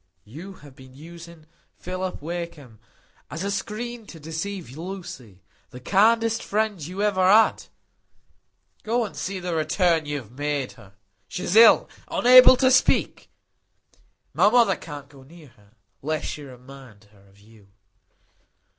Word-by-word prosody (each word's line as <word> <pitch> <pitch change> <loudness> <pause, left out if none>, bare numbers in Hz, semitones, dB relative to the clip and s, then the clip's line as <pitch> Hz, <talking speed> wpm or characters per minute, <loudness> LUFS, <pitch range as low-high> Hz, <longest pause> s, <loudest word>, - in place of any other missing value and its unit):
You 160 - -10
have 140 -2 -15
been 130 -2 -16
using 170 +1 -13 0.3
Philip 185 -3 -6
Wakem 165 -9 -7 0.5
as 160 +6 -6
a 200 - -2
screen 230 +2 -5
to 165 - -12
deceive 160 -1 -6
Lucy,—the 130 - -11
kindest 225 - +2
friend 210 -5 -2
you 185 +6 -5
ever 195 -3 +1
had. 210 +4 +4 1.2
Go 230 +2 -1
and 205 - -10
see 190 0 -4
the 180 -1 -4
return 160 0 +1
you 145 0 -3
have 115 -6 -10
made 145 0 -3
her. 100 -3 -18 0.3
She's 180 +1 -4
ill; 230 +1 +7 0.2
unable 255 +1 +7
to 260 0 +3
speak. - - +1 1.0
My 205 - +4
mother 230 -4 +3
can't 145 -3 -10
go 140 -1 -17
near 155 +2 -16
her, 105 -2 -26 0.3
lest 155 +2 -3
she 150 - -6
should 145 - -10
remind 125 -4 -15
her 100 -1 -23
of 100 +1 -24
you." 105 -1 -21
165 Hz, 140 wpm, -23 LUFS, 135-200 Hz, 1.2 s, ill